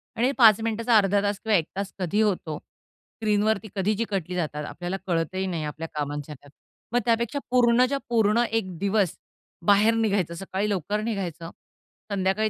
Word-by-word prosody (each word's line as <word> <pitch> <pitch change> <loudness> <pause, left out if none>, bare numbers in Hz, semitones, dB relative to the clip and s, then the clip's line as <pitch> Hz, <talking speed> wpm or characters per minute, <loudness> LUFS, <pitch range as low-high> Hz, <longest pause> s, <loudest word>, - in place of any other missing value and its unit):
आणि 245 +4 +2
5 225 -5 +7
मिनिटाचा 230 +1 +2
अर्धा 200 -1 +3
तास 205 0 -1
किंवा 220 -1 +1
1 165 - 0
तास 200 -1 -3
कधी 185 +4 0
होतो, 180 -7 0
स्क्रीनवरती 215 +1 -3
कधी 200 +2 +1
चिकटली 195 -6 -2
जातात 150 -4 -3
आपल्याला 175 +4 -4
कळतही 175 +2 -1
नाही 170 -4 -3
आपल्या 155 +2 -5
कामांच्या 145 0 -4
त्यात. 145 +1 -19 0.4
मग 245 - +4
त्यापेक्षा 235 +3 +1
पूर्णच्या 250 +2 +4
पूर्ण 225 0 +3
एक 190 -6 -2
दिवस 200 -1 +1 0.5
बाहेर 205 +3 +5
निघायचं 205 -6 0
सकाळी 195 +3 -3
लवकर 205 +2 -1
निघायचं. 185 -7 -4 0.6
संध्याकाळी 200 +2 +1
200 Hz, 155 wpm, -25 LUFS, 175-220 Hz, 0.6 s, 5